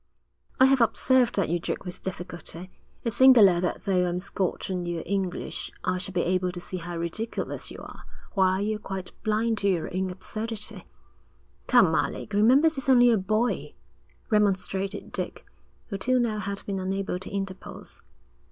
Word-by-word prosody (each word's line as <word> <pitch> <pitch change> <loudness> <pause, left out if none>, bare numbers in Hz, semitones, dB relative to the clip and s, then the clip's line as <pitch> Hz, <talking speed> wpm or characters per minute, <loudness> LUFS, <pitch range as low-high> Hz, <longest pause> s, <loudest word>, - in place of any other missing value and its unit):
'I 260 - +8
have 265 -1 +4
observed 250 +1 +3
that 195 - +1
you 170 +2 0
joke 170 - -4
with 180 - -7
difficulty. 180 -1 -6 0.3
It's 230 -3 -1
singular 225 -9 +7
that 180 - -2
though 180 -2 +2
I'm 175 +1 -2
Scotch 190 -1 -2
and 180 -1 -2
you 170 -1 -2
are - - -9
English, 190 -2 -3
I 185 0 0
should 195 0 -4
be 175 - +2
able 180 0 0
to 175 - -4
see 185 +1 -6
how 175 0 -6
ridiculous 170 +7 -3
you - - -9
are, - - -11 0.3
while 190 -1 +3
you're 210 +1 -1
quite 190 -3 -6
blind 220 0 0
to 200 - 0
your 175 -2 -1
own 190 0 0
absurdity.' 215 +4 -4 0.8
'Come, - - +5
Alec, 215 - -1
remember 245 +9 +5
he's 275 -4 -1
only 245 -2 +7
a 225 - +4
boy,' 215 +5 -1 0.6
remonstrated 195 -1 0
Dick, - - -4 0.4
who 200 -3 -4
till 255 +4 +2
now 225 -3 0
had 200 0 -4
been 195 -1 -3
unable 190 -1 -2
to 190 - -8
interpose. 195 -2 -6
195 Hz, 170 wpm, -26 LUFS, 185-220 Hz, 0.8 s, I